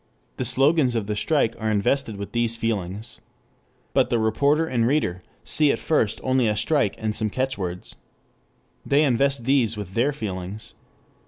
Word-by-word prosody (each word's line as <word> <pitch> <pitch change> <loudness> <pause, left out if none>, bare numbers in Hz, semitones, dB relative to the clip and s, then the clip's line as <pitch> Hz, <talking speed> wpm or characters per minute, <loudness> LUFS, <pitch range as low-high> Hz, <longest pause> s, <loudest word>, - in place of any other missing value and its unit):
The 130 - -2
slogans 135 +1 +3
of 110 -3 -1
the 105 +1 -2
strike 115 +2 +1
are 110 -1 -1
invested 110 +3 0
with 100 0 -7
these 120 -1 0
feelings. 110 0 -4 0.7
But 130 -2 +3
the 120 - +1
reporter 140 +8 +2
and 120 -7 0
reader 120 -11 0 0.2
see 150 -2 +3
at - - -1
first 115 -9 0
only 130 -2 +2
a 105 0 0
strike 115 -1 +1
and 110 -1 -2
some 110 - -1
catchwords. 100 -8 -4 0.9
They 145 +2 +3
invest 135 -2 +1
these 120 -5 +2
with 100 -3 -7
their 125 +7 +2
feelings. 100 -5 -6
115 Hz, 160 wpm, -24 LUFS, 105-135 Hz, 0.9 s, slogans